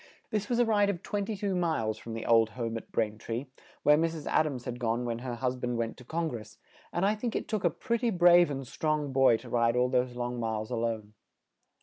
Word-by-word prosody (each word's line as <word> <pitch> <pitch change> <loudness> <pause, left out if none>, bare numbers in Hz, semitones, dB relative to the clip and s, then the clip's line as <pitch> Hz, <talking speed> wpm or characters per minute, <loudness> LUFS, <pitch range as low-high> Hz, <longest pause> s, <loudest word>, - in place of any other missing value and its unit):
This 210 -2 -1
was 240 - +1
a 240 - +4
ride 205 -2 +3
of 180 -3 -3
twen 205 -1 -2
ty 220 - -2
two 200 0 -2
miles 155 -12 0
from 115 -1 -7
the 115 - -5
old 115 -1 +5
home 115 -2 -2
at 115 - -7
Brain 105 0 -1
tree, 115 +4 -4 0.4
where 150 0 +6
Mrs. 165 -2 -1
Ad 155 - +2
ams 130 -5 -5
had 125 -1 -5
gone 120 0 0
when 115 -1 -2
her 125 -1 -4
hus 125 +1 -1
band 125 -1 -2
went 115 -1 -2
to 125 - -12
Con 165 +6 -2
gress, 110 -7 -7 0.3
and 175 - 0
I 205 - +3
think 220 +1 -3
it - - -2
took 215 -3 -2
a 175 - +4
pret 235 +8 -2
ty 240 - +2
brave 175 -3 +6
and 135 -2 -4
strong 150 0 -1
boy 130 -3 +5
to - - -12
ride 115 0 +2
all 125 +1 +3
those 125 -1 +1
long 120 0 -3
miles 110 0 -2
a - - 0
lone. 115 -2 -2
125 Hz, 255 wpm, -29 LUFS, 115-175 Hz, 0.4 s, where